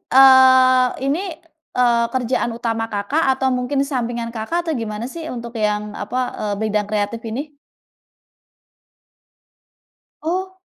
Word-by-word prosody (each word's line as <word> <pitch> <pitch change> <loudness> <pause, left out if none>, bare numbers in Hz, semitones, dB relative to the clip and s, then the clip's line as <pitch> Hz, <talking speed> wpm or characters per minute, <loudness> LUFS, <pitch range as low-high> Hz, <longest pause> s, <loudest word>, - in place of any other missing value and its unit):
eee, 260 -1 +6
ini, 280 +4 +1 0.6
eee, 240 -2 +3
kerjaan 250 -1 0
utama 225 -1 -2
Kakak 210 +11 0
atau 265 0 -1
mungkin 250 +3 -1
sampingan 240 -2 -2
Kakak, 220 +10 -2
atau 320 - -1
gimana 215 0 -4
sih 335 -1 -7
untuk 235 0 -7
yang 210 0 0 0.2
apa, 210 +5 -4 0.2
eee, 210 -1 -2
bidang 210 -1 0
kreatif 215 +2 -2
ini? 285 +7 -5 2.7
Oh. 375 +3 -3
245 Hz, 115 wpm, -20 LUFS, 225-265 Hz, 2.7 s, eee